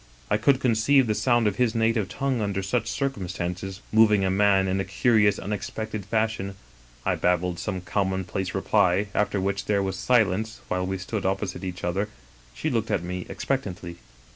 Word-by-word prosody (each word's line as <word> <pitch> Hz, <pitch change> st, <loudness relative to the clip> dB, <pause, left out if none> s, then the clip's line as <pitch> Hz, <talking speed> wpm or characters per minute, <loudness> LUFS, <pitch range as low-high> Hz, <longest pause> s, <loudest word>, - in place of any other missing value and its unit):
I 105 Hz, -, +4 dB
could 130 Hz, +4 st, +3 dB
conceive 130 Hz, +2 st, +3 dB
the 110 Hz, -, +1 dB
sound 120 Hz, +1 st, +2 dB
of 105 Hz, -2 st, +1 dB
his 125 Hz, -2 st, +1 dB
native 115 Hz, -3 st, +1 dB
tongue 135 Hz, -4 st, -1 dB
under 100 Hz, -2 st, -1 dB
such 110 Hz, +4 st, -1 dB
circumstances 95 Hz, -7 st, -3 dB
moving 105 Hz, -3 st, +5 dB
a 95 Hz, -, +1 dB
man 95 Hz, 0 st, +3 dB
in 95 Hz, +1 st, 0 dB
a -, -, +1 dB
curious 105 Hz, +1 st, +3 dB
unexpected 105 Hz, 0 st, -4 dB
fashion. 110 Hz, -3 st, -1 dB, 0.3 s
" -, -, -27 dB
I -, -, +2 dB
babbled 90 Hz, 0 st, 0 dB
some 95 Hz, -1 st, -3 dB
commonplace 95 Hz, 0 st, -2 dB
reply, 95 Hz, +3 st, +2 dB
after 105 Hz, -1 st, +1 dB
which 100 Hz, +1 st, -1 dB
there 100 Hz, -1 st, +1 dB
was 95 Hz, -1 st, -2 dB
silence 110 Hz, -1 st, +1 dB
while 90 Hz, 0 st, -1 dB
we 95 Hz, 0 st, -2 dB
stood 95 Hz, +3 st, -4 dB
opposite 95 Hz, 0 st, -2 dB
each 90 Hz, -1 st, -5 dB
other, 95 Hz, +4 st, -1 dB, 0.5 s
she 60 Hz, -, -2 dB
look -, -, -1 dB
ing -, -, +2 dB
at -, -, -3 dB
me 90 Hz, 0 st, -5 dB
expectantly. 95 Hz, -5 st, -3 dB
100 Hz, 180 wpm, -25 LUFS, 95-110 Hz, 0.5 s, moving